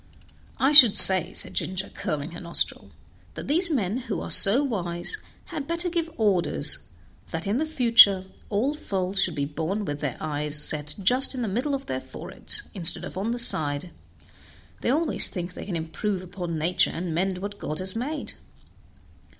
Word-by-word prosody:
"I 270 +2 +1
should 255 -8 +8
say," 185 -2 +7
said - - +3
Ginger, 190 +1 -3
curling 150 +2 -5
her 170 - -9
nostril, 170 -1 -1 0.5
"that - - -7
these 340 +5 +1
men, 220 - -2
who 260 0 -5
are - - -5
so 230 +9 +7
wise, 180 - -3 0.3
had 300 -5 -7
better 335 +2 -2
give 335 -1 -2
orders 180 - 0 0.5
that 165 +1 -5
in 200 +4 -1
the 315 +3 -2
future 230 -9 +5 0.2
all 225 +8 -1
foals 195 -8 -2
should - - 0
be 140 -1 -2
born 165 +8 -4
with 145 -3 -5
their 145 -4 -4
eyes 150 -1 -2
set 150 0 -2
just 255 +7 +5
in 250 - -4
the - - -3
middle 250 +8 -2
of 270 - -7
their 130 0 -5
foreheads, - - -7
instead 175 -3 0
of - - -10
on 195 +4 -3
the 240 - -3
side; 155 -7 +1 0.9
they - - -3
always 310 +5 +3
think 180 0 -6
they - - -9
can 190 - -5
improve 180 +4 -4
upon 175 -2 -6
nature 170 +4 +1
and 170 0 -5
mend 185 +3 -2
what 205 +2 -8
God 155 - -5
has 185 +2 -1
made." 285 +7 -4
190 Hz, 180 wpm, -24 LUFS, 170-250 Hz, 0.9 s, should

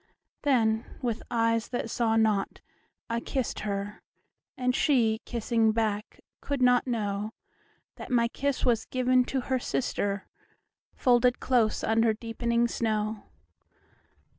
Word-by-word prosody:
Then, 225 -5 +2 0.2
with 235 -2 -1
eyes 230 -1 +1
that 245 -2 -3
saw 225 -2 +1
not, 215 -3 +1 0.5
I 230 0 -1
kissed 260 +1 -3
her; 205 0 -4 0.6
And 250 0 0
she, 230 -7 +2
kissing 230 -1 +1
back, 215 -1 -2 0.2
could 285 -1 -2
not 250 -1 +4
knowThat 210 -3 -6
my 235 -2 +3
kiss 280 +3 -2
was 240 -3 +2
given 255 0 +2
to 265 0 -1
her 260 +1 -1
sister, 200 -5 -2 0.7
Folded 245 -1 +3
close 235 -4 +1
under 225 0 +3
deepening 235 +1 0
snow. 215 -2 -2
230 Hz, 115 wpm, -28 LUFS, 220-250 Hz, 0.7 s, not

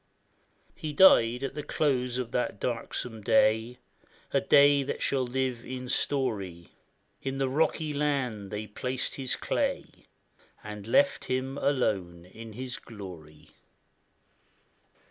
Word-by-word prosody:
He 155 -4 -5
died 125 -8 +6
at 135 - -3
the 150 - -4
close 130 -4 0
of 125 -2 -3
that 125 -4 -1
darksome 115 -1 -3
day, 110 +4 +3 0.5
A - - +2
day 140 0 +6
that 135 - -3
shall 135 -1 +1
live 125 -1 -2
in 125 0 -6
story; 100 -13 -1 0.5
In 135 0 -3
the 135 -1 +1
rocky 155 +2 0
land 135 -9 -1
they 105 +1 -4
placed 125 +5 -3
his 130 -2 0
clay, - - -2 0.2
" - - -32
And 105 -1 -8
left 140 +4 +3
him 130 +1 -2
alone 95 -11 0
with 115 -1 -10
his 125 +1 -4
glory." 85 -8 -11
125 Hz, 125 wpm, -28 LUFS, 110-135 Hz, 0.5 s, died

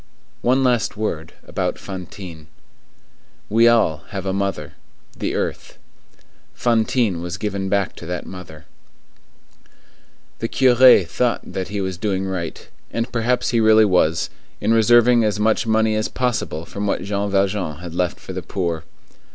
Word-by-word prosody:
One 130 +2 +2
last 120 -5 +1
word 85 -7 -3
about - - -2
Fantine. 90 -4 -9 1.0
We 115 +2 +5
all 115 -10 +4
have 100 -1 -5
a 95 - -1
mother,—the 95 -7 -5
earth. - - -4 0.8
Fantine 115 -5 +1
was 90 +2 -4
given 100 -2 -3
back 100 -1 0
to 85 - -9
that 90 0 -4
mother. 80 -4 -10 1.7
The 115 - -2
curé 125 -7 +6
thought 120 +7 0
that 95 -1 -3
he 100 0 -3
was 95 -2 -4
doing 95 -2 -1
right, 90 -4 -5 0.2
and 115 +1 -3
perhaps 120 +1 0
he 120 - +2
really 110 0 +6
was, 85 -4 +2 0.3
in 110 +2 +2
reserving 120 +1 +5
as 105 -1 0
much 110 +1 +1
money 110 0 +2
as 110 - 0
possible 115 -10 -2
from 100 +4 -4
what - - -1
Jean 100 0 -2
Valjean 95 -5 0
had 85 0 -8
left 90 0 -1
for - - -8
the - - -4
poor. 85 -4 -3
100 Hz, 145 wpm, -21 LUFS, 90-115 Hz, 1.7 s, curé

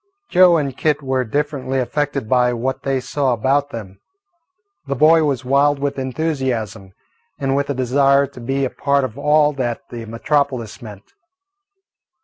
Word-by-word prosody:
Joe 180 -2 +6
and 140 -4 -2
Kit 150 -1 0
were 130 -1 0
differently 135 +1 -2
affected 140 -1 -2
by 125 0 +2
what 130 +3 -3
they 135 -1 -1
saw 130 +1 -1
about 135 +5 +1
them. 100 -7 -9 0.9
The 140 - -1
boy 160 +3 +5
was 135 -3 -1
wild 140 +2 +3
with 140 0 -3
enthusiasm 130 -8 -3 0.4
and 135 -1 -1
with 140 0 -1
a 140 - -1
desire 140 +2 +3
to 135 -2 -13
be 135 +3 -1
a 130 - -4
part 140 -1 +1
of 120 -4 -4
all 150 +1 +3
that 120 -4 -3
the 115 -1 -7
metropolis 130 -1 -1
meant. 105 -4 -12
135 Hz, 155 wpm, -19 LUFS, 125-145 Hz, 0.9 s, Joe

